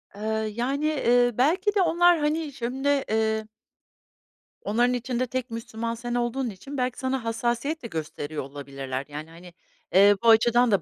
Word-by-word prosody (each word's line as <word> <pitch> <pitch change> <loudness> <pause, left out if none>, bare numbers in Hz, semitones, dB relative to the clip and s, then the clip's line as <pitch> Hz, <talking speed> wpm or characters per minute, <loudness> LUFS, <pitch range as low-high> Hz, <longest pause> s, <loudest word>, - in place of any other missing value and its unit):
Eee, 205 - -10 0.3
yani, 275 +5 -1
eee, 245 -5 +3
belki 370 - +2
de 390 - +4
onlar, 345 0 +4
hani, 300 -1 -1
şimdi, 255 +4 -3 0.2
eee 220 0 0 1.1
Onların 240 +4 +1
içinde 250 +1 -2
tek 255 -1 -4
Müslüman 230 0 -4
sen 240 +1 -4
olduğun 240 +1 -1
için 270 +9 -8
belki 250 -1 -1
sana 260 -1 -2
hassasiyet 240 +6 -2
de - - -4
gösteriyor 155 -3 -5
olabilirler, 135 -1 -6
yani, 150 +2 -7
hani, 170 +1 -13 0.4
eee, 200 +2 +7
bu 230 - +5
açıdan 235 +1 +5
da 195 -4 +3
240 Hz, 155 wpm, -26 LUFS, 210-265 Hz, 1.1 s, eee